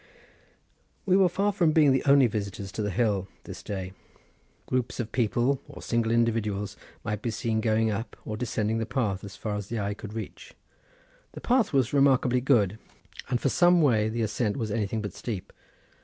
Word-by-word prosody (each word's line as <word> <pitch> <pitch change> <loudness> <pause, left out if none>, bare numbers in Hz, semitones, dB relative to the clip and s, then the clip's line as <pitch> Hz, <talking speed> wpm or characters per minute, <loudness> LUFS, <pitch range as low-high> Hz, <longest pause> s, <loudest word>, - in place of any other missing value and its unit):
We 185 -2 +3
were 190 -2 +5
far 200 +4 +1
from 170 -5 +2
being 150 -3 +5
the 130 - +2
only 140 -1 +6
visitors 100 -3 -3
to 110 - -4
the 105 - -1
hill 100 -2 0 0.2
this - - -9
day; 95 -2 -5 0.7
groups 125 -1 -2
of 115 -3 -3
people, 120 +3 +1
or - - -11
single 115 -1 0
individuals, 110 -3 0 0.3
might 105 -1 -3
be 120 - -2
seen 110 0 -1
going 110 0 +2
up 110 +3 -4
or 110 - -4
descending 110 -1 -1
the 115 - -2
path 110 -7 -1
as 100 -1 -8
far 105 0 -4
as 105 -2 -5
the 115 0 -3
eye 100 0 -1
could 105 0 -9
reach. 110 -1 -8 0.8
The - - -9
path 245 -3 +2
was 135 -3 +1
remarkably 130 -3 +3
good, 110 -6 +2 0.5
and 125 -1 +1
for 135 - +1
some 175 +4 +4
way 110 -6 +3
the 115 +1 -2
ascent 105 0 -1
was 110 -5 -3
anything 110 0 -1
but 100 -3 -5
steep. 105 -7 -6
115 Hz, 185 wpm, -27 LUFS, 105-130 Hz, 0.8 s, only